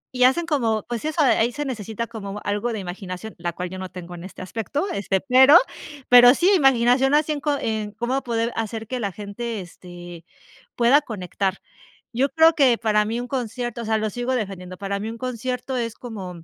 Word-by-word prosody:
y 250 0 +4
hacen 300 +7 +3
como, 230 - 0
pues 240 +2 -4
eso, 310 +1 0
ahí 240 -3 +3
se 295 +4 -4
necesita 225 -3 -4
como 210 -3 -7
algo 205 +4 -1
de 225 - -3
imaginación, 190 +2 -7
la 175 0 -2
cual 180 +1 -5
yo 185 - -7
no 185 0 -6
tengo 180 -1 -9
en 175 -1 -9
este 185 0 -9
aspecto, 230 - -3
este, 195 -1 -1
pero 265 +3 +7 0.5
pero 245 +1 +9
sí, 360 +6 +3
imaginación 270 -2 +4
así 305 +1 +2
en 300 - -2
co 295 -1 0
en 215 -2 -2
cómo 240 +5 -2
poder 235 -1 -2
hacer 225 0 -4
que 255 0 -3
la 200 -4 -2
gente, 210 +3 -5
este, 175 -1 -11 0.5
pueda 245 +5 +5
conectar. 195 -5 -3 0.6
Yo 265 +4 +1
creo 325 +2 +5
que 260 -5 +4
para 215 -2 +2
mí 225 +3 -2
un 245 - -5
concierto, 240 -2 -4
o - - -6
sea, 220 0 +1
lo 215 0 -1
sigo 245 +4 -2
defendiendo, 185 -5 -5
para 200 0 -3
mí 215 +2 -4
un 230 - -7
concierto 250 +1 -4
es 230 -2 -3
como 190 -8 -8
230 Hz, 205 wpm, -23 LUFS, 200-255 Hz, 0.6 s, pero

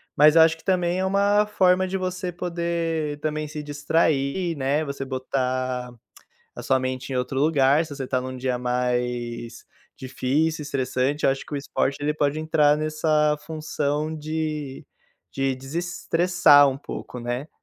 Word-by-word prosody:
Mas 150 +2 +6
eu 165 - +8
acho 160 0 +4
que - - -20
também 180 -1 +1
é 190 - 0
uma 200 +2 +3
forma 185 -3 +3
de 190 - -4
você 185 0 -3
poder, 170 -3 -2
também, 155 0 -2
se 150 0 -6
distrair, 150 +2 0
né, 140 +3 0
você 140 -2 -5
botar 130 -1 -2 0.6
a - - -8
sua 130 - +2
mente 130 +1 -4
em - - -1
outro 125 +1 -2
lugar. 145 0 +3
Se 150 - -8
você 135 -1 -5
está 130 0 -1
num 130 0 -6
dia 125 -1 -2
mais 125 -1 -2 0.3
difícil, 140 +4 -1
estressante, 140 0 -1
eu - - +5
acho 135 0 -4
que - - -6
o - - 0
esporte 140 0 -1
ele 150 +1 0
pode 150 0 0
entrar 155 -2 +3
nessa 155 0 +1
função 155 -1 -2
de 155 -3 -4 0.5
de 135 -1 -1
desestressar 165 +1 +3
um 135 0 -3
pouco, 125 - -7
né. 120 +4 -4
150 Hz, 160 wpm, -24 LUFS, 130-160 Hz, 0.6 s, eu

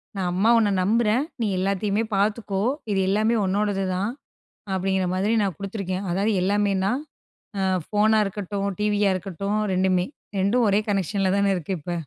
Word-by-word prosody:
நான் 185 -2 -1
அம்மா 200 +5 +2
உன்ன 210 -3 +3
நம்புறேன், 225 +5 +2 0.2
நீ 225 - +1
எல்லாத்தையுமே 200 +3 0
பார்த்துக்கோ 200 -1 0 0.3
இது 195 - +1
எல்லாமே 215 +4 +2
உன்னோடது 200 0 0
தான், 200 +5 -1 0.6
அப்டிங்குற 190 0 0
மாரி 205 +5 +1
நான் 195 -3 -1
குடுத்துருக்கேன். 195 -1 -4
அதாவது 200 +5 +1
எல்லாமேனா, 200 0 +1 0.7
ஆ - - 0 0.3
ஃபோனா 215 +1 +3
இருக்கட்டும், 200 0 -3
டிவியா 205 -1 +2
இருக்கட்டும் 200 +3 -3
2. 185 -1 +2 0.3
2 225 +5 +2
ஒரே 200 +1 +3
கனெக்ஷன்ல 195 0 0
தானே 200 0 +2
இருக்கு 175 +2 -4
இப்ப. 175 +4 -5
200 Hz, 145 wpm, -24 LUFS, 190-210 Hz, 0.7 s, உன்ன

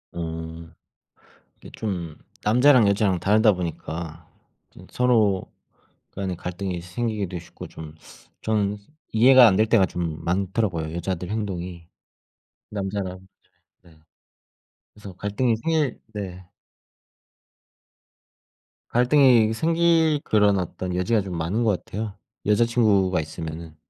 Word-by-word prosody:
음 80 0 -6 0.8
이게 - - -13
좀 90 -7 -4 0.3
남자랑 125 +1 +5
여자랑 100 -2 +2
다르다 105 +3 +4
보니까 85 -2 -6 0.4
좀 - - -15
서로 110 -6 +2 0.7
간의 95 -3 -3
갈등이 90 0 -4
생기기도 100 0 -3
쉽고 85 - -11
좀 80 -1 -10 0.5
전 105 -2 0 0.3
이해가 125 +2 +7
안 95 - +2
될 110 - +3
때가 110 -3 +4
좀 85 -3 -4
많더라고요 90 -3 -1
여자들 85 +1 -3
행동이. 90 -5 -5 0.8
남자랑 95 -2 -4 0.6
네 85 -3 -20 1.0
그래서 105 -2 -11
갈등이 105 +5 0
생길 155 +1 -1
네. 95 -3 -6 2.5
갈등이 125 -3 +4
생길 165 +2 +2
그런 105 -2 +3
어떤 90 0 -4
여지가 95 +5 +1
좀 95 -2 -6
많은 90 +9 -1
것 105 -5 0
같아요 105 0 -5 0.3
여자친구가 105 -5 +3
있으면은. 80 0 -7
100 Hz, 230 characters per minute, -24 LUFS, 90-110 Hz, 2.5 s, 이해가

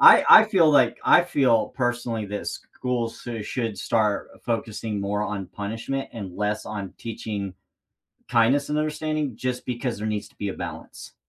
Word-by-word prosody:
I - - +9
I 220 - +10
feel, 180 -7 +4
like 130 -5 +4
I 175 - +7
feel, 130 -11 +2
personally, 120 -3 -1
that 105 +1 -5
schools 120 -2 -4
sou 115 -3 -5
should 115 -2 -3
start 105 +6 0
focusing 110 -2 -2
more 105 +1 -1
on 100 -3 -3
punishment 115 +6 -4
and 100 -6 -7
less 105 +1 -1
on 100 -4 -6
teaching 105 -4 -5 0.7
kindness 125 +5 +3
and 150 - 0
understanding 155 -3 -1
just 125 0 -3
because 125 -1 -3
there 110 +1 -3
needs 105 -1 -2
to - - -28
be 100 -1 -3
a - - -4
balance. - - -8
115 Hz, 165 wpm, -25 LUFS, 105-130 Hz, 0.7 s, I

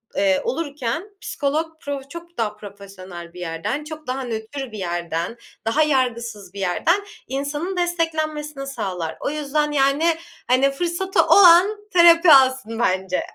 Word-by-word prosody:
eee, 195 -1 +2
olurken 305 - -3
psikolog 295 +3 -1 0.2
pro 285 -1 -4
çok 340 +2 -11
daha 210 -2 -1
profesyonel 195 -4 -11
bir 180 - -11
yerden, 175 - -3
çok 310 -2 -9
daha 260 +1 -2
nötr 235 +3 -5
bir 215 - -8
yerden, 175 +2 -3 0.3
daha 300 +7 +3
yargısız 235 -8 -1
bir 200 - -8
yerden 325 - +1 0.2
insanın 290 +8 -3
desteklenmesini 310 -5 -2
sağlar. 180 -11 -4
O - - -2
yüzden, 300 0 -1
yani, 290 +4 +2 0.3
hani, 265 +2 +3
fırsatı 350 +5 0
olan 375 +2 +7 0.2
terapi 340 -1 +7
alsın 260 -4 +3
bence. 185 -4 0
275 Hz, 135 wpm, -22 LUFS, 205-315 Hz, 0.3 s, olan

